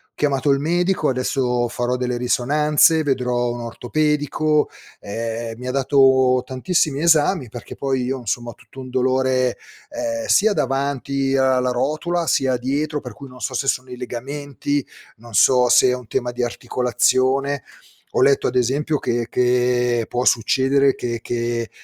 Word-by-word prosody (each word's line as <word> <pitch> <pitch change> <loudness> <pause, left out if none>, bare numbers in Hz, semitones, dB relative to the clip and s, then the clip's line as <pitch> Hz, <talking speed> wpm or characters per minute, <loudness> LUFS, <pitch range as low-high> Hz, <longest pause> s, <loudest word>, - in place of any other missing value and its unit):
chiamato 145 -1 0
il 140 - +2
medico, 175 +1 0
adesso 125 -1 0
farò 120 +1 -2
delle 125 -1 -2
risonanze, 150 +6 +2
vedrò 125 -3 0
un 120 - -6
ortopedico, 150 +5 0 0.3
ehm, 115 +2 -5
mi 125 - -7
ha - - -1
dato 130 -1 +3
tantissimi 140 +2 -1
esami, 160 - +3
perché 120 +1 -9
poi 135 -2 -1
io, 130 +1 -2
insomma, 120 +1 -3
ho - - -13
tutto 135 - -16
un 130 -1 -8
dolore, 130 0 +1 0.3
ehm, 290 -1 -3
sia 210 +1 +4
davanti 135 -1 -1
alla 130 -1 +2
rotula, 155 +7 -1
sia 130 -1 +2
dietro 145 +4 -2
per 125 - -8
cui 140 +3 -11
non 125 -1 -14
so - - -3
se 135 - -2
sono 130 -1 -1
i 125 - -7
legamenti, 140 +3 -4 0.3
non 115 0 -14
so 125 +4 +5
se 125 +1 +5
è - - +2
un 125 -3 -10
tema 120 0 -2
di 120 0 -3
articolazione. 130 +3 0 0.5
Ho - - +4
letto 140 - +3
ad 125 - -3
esempio 140 +5 +1
che 120 -1 -2
che 125 -1 +1
può 125 +1 -2
succedere 135 +4 +3
che 120 -1 -4
che 120 -1 -3
130 Hz, 155 wpm, -21 LUFS, 125-140 Hz, 0.5 s, so